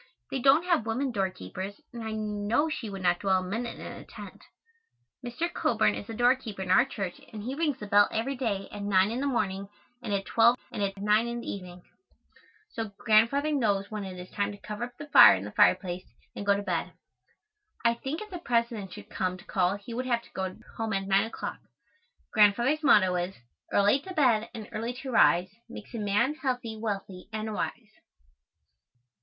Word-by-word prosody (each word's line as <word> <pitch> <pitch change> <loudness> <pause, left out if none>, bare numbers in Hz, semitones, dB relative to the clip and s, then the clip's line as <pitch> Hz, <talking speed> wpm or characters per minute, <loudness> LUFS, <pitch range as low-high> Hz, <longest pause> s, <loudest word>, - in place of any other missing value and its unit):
They 270 - -1
don't 275 +6 +5
have 335 -11 +1
women 255 +4 -1
doorkeepers, 190 - -4
and 235 - -6
I 220 - -4
know 215 +7 0
she 235 -7 -4
would 195 -1 -7
not 175 -1 +3
dwell 190 -2 +2
a - - -6
minute 230 +5 -3
in - - -8
a - - -8
tent. - - -11 0.8
Mr. 245 +8 -2
Coburn - - +2
is 205 - -6
the 225 - -6
doorkeeper 240 -4 +1
in 185 - -2
our 190 - +6
church 195 -9 -5
and 215 -2 -7
he 250 +4 -3
rings 295 -2 0
the 210 - -7
bell 205 0 +5
every 250 +5 -1
day 215 -7 -2
at 205 - -7
nine 200 0 +3
in 240 - -2
the 285 - 0
morning 195 -5 -1 0.3
and 230 - -5
at 200 -1 0
twelve 235 +2 +4
and 225 -4 -4
at 195 0 -1
nine 210 +3 +2
in 235 0 -4
the - - -10
evening, 180 -2 -8 0.9
so 225 -2 -4
Grandfather 235 +7 +3
knows 205 -8 0
when 210 -1 -4
it 185 -1 -7
is 180 0 -9
time 205 -1 -1
to 205 - -9
cover 210 +3 -5
up 245 0 -14
the 295 - -7
fire 290 - +9
in 95 - -5
the 105 - -7
fireplace 185 - +2 0.2
and 200 - -6
go 200 - +5
to 205 - -4
bed. 180 -4 -2 0.9
I 235 - +5
think 270 - -5
if 425 -1 -9
the 355 - -5
President 235 - -1
should - - -10
come 185 -1 -2
to 180 - -16
call 185 0 +1
he 205 +3 -9
would 255 +2 -3
have 235 -2 +1
to - - -19
go 190 -1 -4 0.2
home 225 -1 -2
at 195 0 -1
nine 195 +2 +3
o'clock. 225 - -6 0.7
Grandfather's 235 +8 +4
motto 205 - +5
is: 180 +2 -3 0.4
"Early 205 +6 +4
to 370 +6 -9
bed 235 -7 +3
and 220 -2 -7
early 230 +3 -3
to 260 +1 -7
rise 185 -5 +4 0.2
Makes 245 - -10
a 230 - -4
man 210 +7 +1
healthy, 250 -4 -2
wealthy 195 -4 -5
and 215 0 -3
wise." 220 +1 -5
215 Hz, 205 wpm, -28 LUFS, 195-245 Hz, 0.9 s, fire